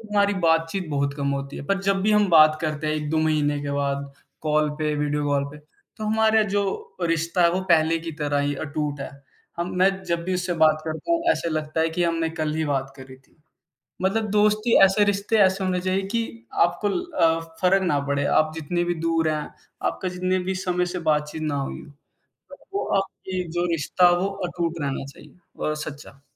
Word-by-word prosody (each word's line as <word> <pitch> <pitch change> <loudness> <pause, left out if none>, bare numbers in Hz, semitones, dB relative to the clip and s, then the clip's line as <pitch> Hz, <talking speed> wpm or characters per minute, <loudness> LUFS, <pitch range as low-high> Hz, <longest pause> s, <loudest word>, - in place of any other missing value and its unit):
हमारी 205 0 +2
बातचीत 165 +2 +1
बहुत 140 0 0
कम 140 -1 -1
होती 140 0 -4
है। - - -6
पर 195 +3 0
जब 195 0 +1
भी 215 - +2
हम 210 -2 +4
बात 155 -1 +6
करते 155 0 -2
हैं 155 - +1
1-2 155 +1 -1
महीने 150 -2 +1
के 145 - -3
बाद 140 0 -2 0.3
कॉल 155 -1 +2
पे, 150 -1 0
वीडियो 145 0 -1
कॉल 140 -1 +1
पे, - - -10
तो 155 +7 -13
हमारा 220 0 +3
जो 200 -1 -2
रिश्ता 165 +1 +1
है 170 - +5
वो 185 - 0
पहले 165 0 +4
की 165 0 -6
तरह 145 -1 0
ही 145 0 0
अटूट 145 -1 -3
है। - - -5 0.5
हम 175 +1 -2
मैं 190 +1 +5
जब 170 -1 -1
भी 185 - -1
उससे 180 0 -1
बात 155 0 +3
करता 160 - -5
हूँ, 335 - +2
ऐसे 170 - -3
लगता 155 0 -2
है 160 - +2
कि 175 +2 -1
हमने 165 -1 0
कल 155 -1 -1
ही 160 - 0
बात 135 -1 -1
करी 130 -1 -11
थी। 135 +4 -29 0.7
मतलब 215 +3 +1
दोस्ती 210 +2 +3
ऐसे, 195 +2 +5
रिश्ते 205 +2 +1
ऐसे 190 -1 +3
होने 180 -1 0
चाहिए 185 +1 0
कि 115 - -3 0.2
आपको 175 +4 0
ल 350 - -1 0.2
अ, 165 0 +4 0.2
फ़र्क 190 +1 +4
ना 150 -6 +1
पड़े, 140 0 0
आप 155 +2 +3
जितनी 175 +3 -1
भी 175 - 0
दूर 165 -1 +2
हैं, 150 -1 -2 0.3
आपका 185 - -1
जितने 185 +1 -1
भी 190 - 0
समय 180 -1 0
से - - -2
बातचीत 150 +1 -2
ना 150 -2 -1
हुई 135 - -5
हो, - - -14 0.6
पर - - -11 0.2
वो 400 - -1
आपकी 190 -1 -3 0.2
जो 175 - +1
रिश्ता 165 +3 +3
हो 175 +2 +2 0.2
अटूट 170 -1 -3
रहना 135 -1 -2
चाहिए - - -16 0.3
और 155 - 0
सच्चा। 140 -2 -10
165 Hz, 205 wpm, -24 LUFS, 150-185 Hz, 0.7 s, बात